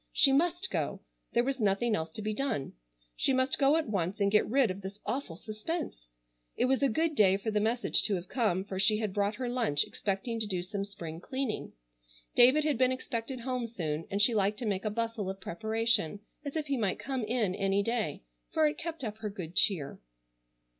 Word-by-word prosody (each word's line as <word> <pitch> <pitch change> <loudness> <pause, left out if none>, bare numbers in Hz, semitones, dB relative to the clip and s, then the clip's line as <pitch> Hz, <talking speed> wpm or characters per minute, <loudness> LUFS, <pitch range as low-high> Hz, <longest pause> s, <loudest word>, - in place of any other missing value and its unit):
She 295 -4 +5
must 345 +6 +1
go. - - -2 0.3
There 240 - +3
was 270 +1 -2
nothing 210 +2 +2
else 160 -2 -3
to 215 - -5
be 215 0 -1
done. 235 - -2 0.4
She 270 - +2
must 260 +1 +2
go 280 +1 +5
at 320 - -1
once 195 -1 -1
and 200 -1 +2
get 210 0 +3
rid 255 -3 +3
of 190 +2 -7
this 195 +2 -7
awful 255 -10 -3
suspense. 215 - -5 0.5
It - - +3
was 265 +1 +2
a 275 - +4
good 320 +7 +1
day 195 -7 +5
for 220 +2 -3
the 210 - +2
message 230 +3 +3
to 205 - +2
have 180 0 -5
come, 210 -7 +1
for 190 -2 -5
she 210 +2 +4
had 215 -3 -2
brought 205 +1 0
her 255 +1 -3
lunch 230 - +2
expecting 210 +4 -3
to 220 - -1
do 180 -3 -1
some 200 +2 -3
spring 165 -5 -7
cleaning. 260 +3 -3 0.6
David 260 +5 +6
had 300 -3 0
been 255 0 +4
expected 255 0 -4
home 250 -1 -2
soon, 165 -8 -3
and 200 +1 +1
she 235 - +5
liked 205 0 +1
to 240 - -4
make 195 -2 -1
a - - +2
bustle 225 -2 -2
of 195 0 -5
preparation 220 0 0 0.2
as 285 0 -5
if 310 -2 -1
he 280 -2 -1
might 205 -5 0
come 265 -3 -3
in 215 -4 0
any 195 0 +1
day, 220 - -2 0.3
for 315 - +3
it 300 0 0
kept 330 -3 -4
up 215 -2 -4
her 215 -1 -3
good 180 -5 -7
cheer. 190 -8 +2
220 Hz, 215 wpm, -30 LUFS, 195-255 Hz, 0.6 s, David